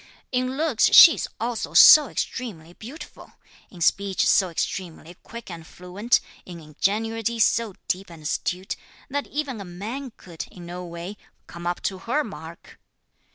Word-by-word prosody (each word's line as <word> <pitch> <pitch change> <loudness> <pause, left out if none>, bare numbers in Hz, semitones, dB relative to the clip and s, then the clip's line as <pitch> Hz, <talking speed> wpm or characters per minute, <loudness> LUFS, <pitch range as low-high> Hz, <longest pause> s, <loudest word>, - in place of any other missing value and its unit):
In 255 +1 -1
looks, 300 -7 +2
she 330 - +9
is - - -4
also 230 +1 -4
so 300 -2 +9
extremely 175 -14 -5
beautiful, 255 - -12 0.4
in 175 - -14
speech 195 +3 +1
so 190 -2 +3
extremely 170 0 -5
quick 235 -4 -10
and 165 -2 -10
fluent, 190 +7 -1 0.2
in 175 -2 -10
ingenuity 220 +9 -2
so 220 -2 +1
deep 190 +1 -2
and 165 -2 -13
astute, 180 +5 -3 0.4
that 285 +1 -2
even 275 -7 -4
a - - -8
man 220 +10 -7
could, 170 -3 -9
in 175 -2 -12
no 175 +1 -7
way, 175 +3 -8 0.3
come 170 +1 -8
up 175 - -3
to 190 -2 -3
her 255 +10 -1
mark." 170 -6 -11
195 Hz, 155 wpm, -24 LUFS, 175-235 Hz, 0.4 s, she